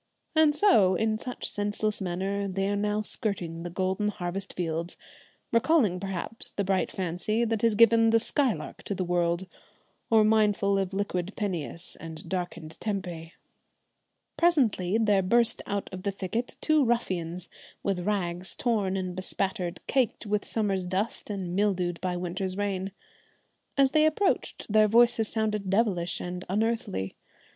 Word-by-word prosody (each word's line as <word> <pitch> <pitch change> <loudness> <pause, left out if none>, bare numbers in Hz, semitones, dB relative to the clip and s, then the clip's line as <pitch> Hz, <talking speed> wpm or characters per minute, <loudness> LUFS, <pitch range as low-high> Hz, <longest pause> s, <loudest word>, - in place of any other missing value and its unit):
And 310 -2 +5
so, 220 - +5
in 215 +3 0
such 250 +1 -4
senseless 205 +1 -1
manner, 195 +2 -2
they 195 0 -1
are 205 - 0
now 210 +1 0
skirting 180 -6 -3
the 175 - -5
golden 190 +3 -1
harvest 190 -1 -4
fields, 170 0 -3 0.5
recalling 230 - +3
perhaps 195 +3 -1
the 200 - -2
bright 190 0 0
fancy 190 +6 -1
that 225 -2 -1
has 230 -2 +3
given 230 0 +6
the 225 0 +5
'Skylark' 255 0 -1
to 200 - -2
the 185 - -1
world, 175 0 0 0.6
or 220 -2 +6
mindful 210 -2 +3
of 190 -1 -1
"liquid 195 -1 -2
Peneus" 175 -4 -4
and 160 -1 -9
"darkened 175 -3 -4
Tempe." 180 -6 -4 1.0
Presently 230 - +3
there 210 -3 +3
burst 230 +4 +3
out 200 0 -2
of 185 - -5
the 200 - -1
thicket 200 +5 -4
two 310 -2 +3
ruffians, 180 -7 -1 0.4
with 195 -2 0
rags 180 -2 -2
torn 205 -6 0
and 185 -1 -3
bespattered, 185 -1 -2
caked 255 -4 0
with 210 0 -1
summer's 200 -4 0
dust 190 +6 -2
and 185 -4 -3
mildewed 185 -4 0
by 180 -1 -1
winter's 185 +2 -3
rain. 195 -1 -2 0.9
As 270 -1 +5
they 310 0 +5
approached 370 +6 0
their 215 0 +5
voices 230 0 +4
sounded 210 -3 -1
devilish 190 -5 +1
and 180 0 -5
unearthly. 215 - -1
200 Hz, 145 wpm, -28 LUFS, 180-220 Hz, 1.0 s, given